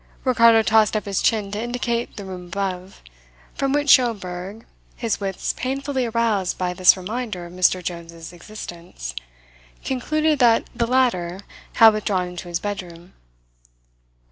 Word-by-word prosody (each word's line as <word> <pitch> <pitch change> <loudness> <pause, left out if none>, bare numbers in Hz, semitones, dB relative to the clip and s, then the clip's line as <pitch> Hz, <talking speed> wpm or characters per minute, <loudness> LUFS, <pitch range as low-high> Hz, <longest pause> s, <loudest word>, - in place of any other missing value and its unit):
Ricardo 230 -3 +5
tossed 220 0 +3
up 210 - -4
his 200 -2 -1
chin 210 -3 +1
to 205 +1 -3
indicate 240 -1 -3
the 200 - -6
room 180 -2 -8
above; 185 0 -5 0.5
from 275 -1 -1
which 290 +1 0
Schomberg, 205 -5 +1 0.3
his 230 -3 -2
wits 195 -2 -3
painfully 270 0 -2
aroused 225 -5 0
by 180 -1 -1
this 185 +1 +5
reminder 210 -1 -5
of 175 - -11
Mr. 185 0 +2
Jones's 170 -1 -7
existence, 170 - -9 0.7
concluded 305 +3 0
that 235 -3 +4
the 235 -1 -1
latter 200 -8 +1 0.3
had 225 -1 +7
withdrawn 195 -4 -1
into 180 0 -8
his 170 -1 -2
bedroom. 180 -3 -7
205 Hz, 140 wpm, -22 LUFS, 180-235 Hz, 0.7 s, had